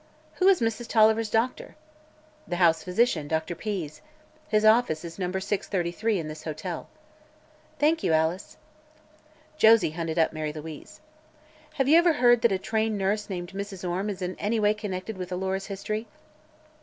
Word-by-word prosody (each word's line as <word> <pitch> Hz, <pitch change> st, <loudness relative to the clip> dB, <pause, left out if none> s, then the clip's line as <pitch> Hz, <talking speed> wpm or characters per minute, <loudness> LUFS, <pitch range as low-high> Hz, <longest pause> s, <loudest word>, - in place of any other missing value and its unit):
"Who 370 Hz, -, +3 dB
is 390 Hz, -2 st, +5 dB
Mrs. 230 Hz, +1 st, -1 dB
Tolliver's 220 Hz, 0 st, +3 dB
doctor?" 230 Hz, +4 st, -1 dB, 0.7 s
"The 175 Hz, -, -2 dB
house 170 Hz, -2 st, +3 dB
physician, 180 Hz, -5 st, +1 dB
Dr. 160 Hz, +2 st, -2 dB
Pease. 170 Hz, -5 st, -5 dB, 0.5 s
His 215 Hz, 0 st, +2 dB
office 215 Hz, -8 st, +3 dB
is 165 Hz, +2 st, -9 dB
No. 180 Hz, -1 st, -2 dB
633, 190 Hz, +1 st, -1 dB
in 165 Hz, -3 st, -4 dB
this 155 Hz, 0 st, -8 dB
hotel." 160 Hz, +2 st, -5 dB, 0.9 s
"Thank 320 Hz, +2 st, +2 dB
you, -, -, 0 dB
Alice." 160 Hz, +4 st, 0 dB, 1.0 s
Josie 225 Hz, -, +6 dB
hunted 165 Hz, 0 st, -4 dB
up 160 Hz, -1 st, +2 dB
Mary 155 Hz, -1 st, -3 dB
Louise. 155 Hz, 0 st, -10 dB, 0.7 s
"Have 270 Hz, -, +1 dB
you 320 Hz, +4 st, +7 dB
ever 345 Hz, -1 st, +4 dB
heard 240 Hz, -4 st, +4 dB
that 235 Hz, -2 st, +3 dB
a 190 Hz, -, +1 dB
trained 220 Hz, +2 st, -1 dB
nurse 205 Hz, +2 st, -1 dB
named 175 Hz, -2 st, -5 dB
Mrs. 195 Hz, -1 st, -6 dB
Orme 185 Hz, +4 st, -2 dB
is 190 Hz, -2 st, -5 dB
in 180 Hz, +1 st, -3 dB
any 220 Hz, +2 st, 0 dB
way 210 Hz, 0 st, +3 dB
connected 205 Hz, -1 st, -6 dB
with 180 Hz, 0 st, -6 dB
Alora's 190 Hz, +1 st, -2 dB
history?" 215 Hz, +3 st, -4 dB
195 Hz, 160 wpm, -26 LUFS, 170-220 Hz, 1.0 s, you